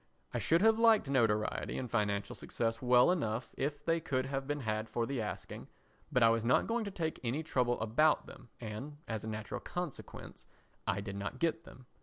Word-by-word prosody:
I - - 0
should 165 +4 +3
have 225 0 +5
liked 225 -7 +5
notoriety 110 -5 +1
and 130 - -3
financial 105 -3 -1
success 115 -1 -2
well 125 +4 +6
enough 120 -9 -1
if 145 +2 -3
they 165 0 +2
could 130 -5 -1
have 135 0 -3
been 145 0 -2
had 110 -1 -2
for 115 - 0
the 135 -1 -2
asking, 105 - -6 0.4
but 125 - +4
I 115 - +7
was 115 0 +2
not 120 +2 +3
going 230 -1 -1
to - - -3
take 165 -5 -3
any 130 +7 -1
trouble 125 -6 +1
about 120 +8 +3
them 125 -2 -13
and, 120 +6 -6
as 110 -2 -3
a - - -5
natural 110 -1 -4
consequence, 175 -5 -6 0.4
I 100 +1 +1
did 100 0 -5
not 105 +6 -4
get 165 +2 0
them. 130 - -14
125 Hz, 200 wpm, -33 LUFS, 110-155 Hz, 0.4 s, I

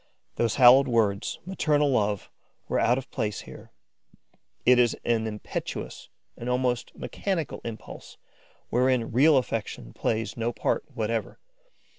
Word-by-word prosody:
Those 115 - 0
hallowed 130 +1 +7
words, 110 -5 +1
maternal 150 -6 +1
love, 105 -5 0 0.4
were - - 0
out 120 +2 +3
of 135 0 -7
place 105 -6 -2
here: - - -12 0.9
it 125 0 +6
is 120 -2 +3
an 115 -1 +1
impetuous, 105 -1 -6 0.3
an 120 - -6
almost 125 -1 -1
mechanical 185 -6 -3
impulse, 115 -2 -9 0.5
wherein 125 -1 +2
real 140 +5 +5
affection 110 - -3
plays 115 0 -2
no 115 0 -1
part - - -1
whatever. - - -2
120 Hz, 125 wpm, -26 LUFS, 110-130 Hz, 0.9 s, hallowed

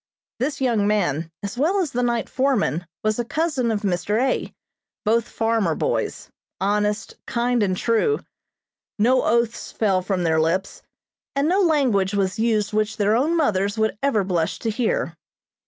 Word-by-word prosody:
This 280 +3 -1
young 230 -6 +2
man, 165 -7 0
as 205 +5 -5
well 355 +8 +2
as 340 -8 -1
the 245 - -1
night 240 -1 0
foreman, 240 - 0 0.2
was 215 +1 0
a - - +1
cousin 300 -2 -1
of 215 -2 -1
Mr. 200 +2 0
A., 260 +1 0 0.5
both 230 +2 +2
farmer 225 -7 0
boys, - - -2 0.3
honest, 210 +2 -1
kind 240 0 +1
and 185 -3 +1
true. 230 - +2 0.8
No 250 +4 +4
oaths 235 0 0
fell 195 -4 +1
from 185 -1 -1
their 160 -1 +2
lips, 185 +5 -1 0.5
and 280 +2 +2
no 375 +4 +3
language 250 - +2
was 195 0 0
used 215 -3 +1
which 215 +1 0
their 210 0 +2
own 305 +8 +2
mothers 205 - +1
would 220 0 +1
ever 250 -8 +2
blush 175 -4 -1
to 225 - -2
hear. 255 - -1
220 Hz, 160 wpm, -23 LUFS, 200-250 Hz, 0.8 s, No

